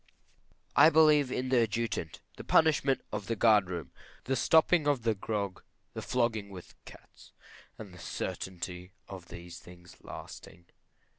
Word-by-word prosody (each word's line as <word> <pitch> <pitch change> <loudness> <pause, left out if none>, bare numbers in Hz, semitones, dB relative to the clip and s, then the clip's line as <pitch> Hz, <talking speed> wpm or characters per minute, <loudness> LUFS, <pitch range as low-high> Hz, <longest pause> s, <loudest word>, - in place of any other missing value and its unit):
I 155 - +8
believe 150 -4 +4
in 130 0 -2
the 130 -1 +3
Adjutant; 115 -7 -3
the - - -9
punishment 145 -4 +3
of 100 - -5
the 115 - -1
guard 105 -4 +4
room; 85 -3 -6 0.3
the 135 - -1
stopping 160 +3 +3
of 140 -5 +1 0.2
grog; 100 -4 -3 0.3
the - - -5
flogging 115 -5 -1
with 95 -3 -11
cats; - - -16 0.4
and 105 -4 -10
the 90 - -13
certainty 90 +1 -6
of 95 -3 -10
these 85 0 -10
things 90 0 -15
lasting. 85 - -11
105 Hz, 140 wpm, -30 LUFS, 90-130 Hz, 0.4 s, I